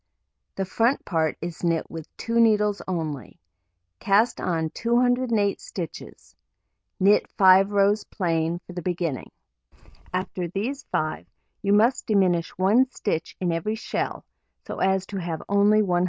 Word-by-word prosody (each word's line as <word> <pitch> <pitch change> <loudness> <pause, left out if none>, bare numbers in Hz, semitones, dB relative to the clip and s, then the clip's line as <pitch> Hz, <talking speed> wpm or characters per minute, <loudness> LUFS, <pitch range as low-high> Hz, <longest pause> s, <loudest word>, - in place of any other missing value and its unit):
The 195 - -2
front 230 +8 +1
part 160 -3 0
is 170 +1 -6
knit 165 -2 +1
with 165 -2 -8
2 230 0 -1
needles 210 -3 +3
only. 160 -7 -4 0.6
Cast 205 +4 +2
on 160 -3 -1
208 235 -3 +1
stitches, - - -8 0.6
knit 200 +2 +4
5 190 -1 +6
rows 205 +1 +3
plain 165 -1 -1
for 180 - -10
the 175 - -5
beginning. 170 -5 -3 0.8
After 185 -1 -3
these 220 - -4
5, 155 - -2 0.3
you 200 0 +1
must 230 +5 +3
diminish 185 -5 +2
1 215 +8 +3
stitch 165 -10 -3
in 180 -2 0
every 165 +7 -1
shell, 220 - -4 0.4
so - - -6
as 190 0 +1
to 195 - -6
have 170 -3 -4
only 205 +2 +4
192. 180 -3 +1
190 Hz, 140 wpm, -24 LUFS, 170-215 Hz, 0.8 s, 5